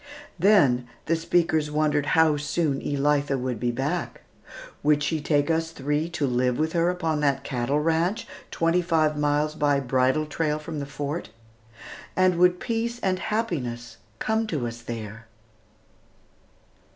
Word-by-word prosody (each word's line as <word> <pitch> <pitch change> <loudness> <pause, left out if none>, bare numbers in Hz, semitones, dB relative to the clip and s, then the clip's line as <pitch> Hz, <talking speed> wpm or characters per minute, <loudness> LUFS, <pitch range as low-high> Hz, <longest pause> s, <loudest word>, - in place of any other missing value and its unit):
Then 145 - +4 0.2
the 165 - +2
speakers 165 -2 +1
wondered 150 -1 +1
how 160 -2 +5
soon 145 0 -1
Elitha 145 0 +1
would 125 -3 -3
be 120 +1 0
back. 140 +8 -3 0.6
Would 145 0 +3
she 155 +1 -1
take 145 +1 +1
us 165 0 0
three 150 +1 -2
to 160 -3 -1
live 125 -1 +1
with 160 +1 -1
her 175 +1 +1
on 160 -2 +1
that 140 -2 +1
cattle 135 +2 -1
ranch 165 +8 0 0.2
twenty 165 +2 +1
five 160 -3 +1
miles 150 +1 +1
by 145 -2 +2
bridle 130 +3 +1
trail 150 0 -1
from 155 0 -6
the 140 - -5
Fort? 145 +3 -4 0.9
And 185 -1 +3
would 180 0 +4
peace 235 0 -2
and 185 -2 0
happiness 145 - -3 0.2
come 220 - 0
to 150 - -2
us 120 0 -6
there? 115 -1 -7
150 Hz, 145 wpm, -25 LUFS, 135-165 Hz, 0.9 s, how